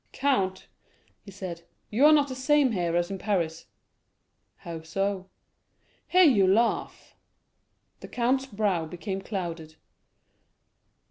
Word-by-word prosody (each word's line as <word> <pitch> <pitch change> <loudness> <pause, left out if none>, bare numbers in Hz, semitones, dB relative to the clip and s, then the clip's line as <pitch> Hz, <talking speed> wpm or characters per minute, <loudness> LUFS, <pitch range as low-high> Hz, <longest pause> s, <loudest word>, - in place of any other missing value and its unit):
"Count," 195 -10 0 0.6
he - - -12
said, 185 -3 -7 0.3
"you 255 +8 +5
are - - +7
not 295 -2 +4
the 260 - -6
same 270 0 +2
here 175 -5 -1
as 175 +2 -1
in 195 - -5
Paris." 170 -6 -2 0.9
"How 165 +6 -8
so?" 190 +3 -3 0.8
"Here 370 +1 +5
you 220 - +5
laugh." 225 +5 0 0.8
The - - -10
count's 260 +2 0
brow 200 -8 -1
became 190 +3 -5
clouded. 170 -6 -5
195 Hz, 120 wpm, -27 LUFS, 175-250 Hz, 0.9 s, are